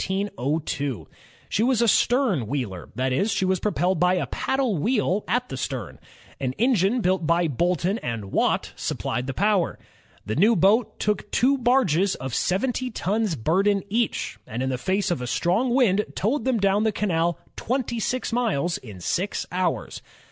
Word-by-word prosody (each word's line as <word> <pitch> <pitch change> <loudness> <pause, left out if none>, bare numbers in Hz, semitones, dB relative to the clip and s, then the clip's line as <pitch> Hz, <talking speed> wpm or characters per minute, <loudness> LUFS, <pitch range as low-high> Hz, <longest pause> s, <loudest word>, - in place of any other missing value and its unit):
She - - 0
was 245 0 +2
a 235 - +3
stern 225 - +2
wheeler, 110 -9 -4
that 130 0 0
is, 200 +12 +1
she 195 -1 0
was 185 -1 +1
propelled 185 -4 0
by 180 +1 +3
a 180 - 0
paddle 265 -6 -1
wheel 210 - +1
at 245 +1 0
the - - -5
stern. - - -5 0.4
An 130 -2 -2
engine 230 - +2
built 185 -4 +1
by 170 0 +3
Boulton 175 - 0
and 115 -5 -5
Watt - - +1
supplied 125 +3 -3
the 135 - -4
power. 200 -3 +1 0.5
The 110 - -2
new 215 +7 +4
boat 205 +6 +3
took 210 0 -1
two 270 +3 +3
barges 235 - +2
of 130 -2 -6
seventy 250 - 0
tons 215 -3 -1
burden 195 - +1
each, 220 - -1
and 120 +4 -3
in 130 - -1
the 125 - -2
face 190 +7 0
of 170 - -1
a 125 - -4
strong 185 - +1
wind 220 -6 +3
toWed 255 +9 0
them 260 -3 +2
down 200 +1 +2
the 220 - +2
canal 175 -5 0 0.2
twenty 240 -2 -2 0.3
miles 210 - 0
in 105 -7 -11
six 185 - -1
hours. 180 -1 -2
190 Hz, 165 wpm, -24 LUFS, 165-230 Hz, 0.5 s, new